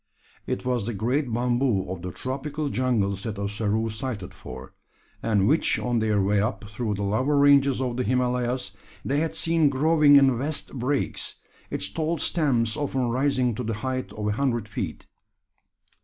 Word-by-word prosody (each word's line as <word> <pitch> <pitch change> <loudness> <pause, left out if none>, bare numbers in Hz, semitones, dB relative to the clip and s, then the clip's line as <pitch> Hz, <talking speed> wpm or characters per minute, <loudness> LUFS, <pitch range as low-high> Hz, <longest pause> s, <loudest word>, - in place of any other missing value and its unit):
It - - -3
was 125 -4 0
the 120 - -3
great 125 +6 0
bamboo 120 -4 +1
of 95 -2 -5
the 90 0 -5
tropical 145 - -4
jungles 110 -8 0
that 105 -1 -4
Ossaroo 105 +2 -1
sighed 110 -5 -5
for; 65 +1 -10 0.5
and 105 -3 +2
which 155 +4 +3
on 120 -1 0
their 110 -2 +1
way 100 +1 +2
up 110 +2 -2
through 105 +1 -3
the 100 - -3
lower 130 +9 +1
ranges 140 -2 +5
of 125 -1 -2
the 125 - 0
Himalayas 125 -2 0 0.3
they 140 +2 +1
had 160 0 -1
seen 165 -2 +2
growing 150 +1 +5
in 135 -4 +5
vast 145 +3 -1
brakes, 135 +2 -1 0.3
its 95 - 0
tall 160 +11 -1
stems 120 -11 +1
often 135 -4 -1
rising 130 -1 +1
to 110 - -4
the 115 -1 -2
height 130 0 -2
of 105 0 -3
a - - +1
hundred 120 -2 -1
feet. 100 - -5
125 Hz, 170 wpm, -25 LUFS, 105-140 Hz, 0.5 s, ranges